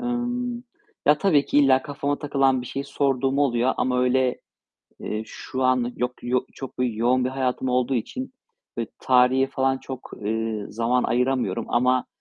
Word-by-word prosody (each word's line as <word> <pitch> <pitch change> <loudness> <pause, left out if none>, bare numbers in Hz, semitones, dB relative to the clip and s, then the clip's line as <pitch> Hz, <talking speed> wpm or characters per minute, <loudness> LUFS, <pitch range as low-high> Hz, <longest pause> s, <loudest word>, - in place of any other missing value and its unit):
ımm, 245 0 -2 0.4
ya, 150 +1 +5
tabii 155 -8 +3
ki - - +2
illa 135 -2 +5
kafama 145 0 -2
takılan 135 -3 +2
bir 125 - -8
şeyi 140 +3 -4
sorduğum 135 -1 0
oluyor 130 -2 +2
ama, 125 -1 +1
öyle, 125 0 +1 0.6
eee, 105 +1 -3
şu 130 +3 -5
an 125 -1 +2
yok 125 +1 -1
yo 125 +1 +1
çok 135 -2 -8
bi 125 -4 0
yoğun 125 +2 +2
bir 130 - 0
hayatım 130 -1 -1
olduğu 125 +1 +1
için, 255 - -4 0.4
böyle, 115 -1 -3
tarihe 130 +1 +4
falan 135 0 0
çok, 130 -1 -8
eee, 110 -1 -2
zaman 115 +3 0
ayıramıyorum. 125 -2 0
Ama, 125 +1 +2
130 Hz, 160 wpm, -24 LUFS, 125-140 Hz, 0.6 s, ya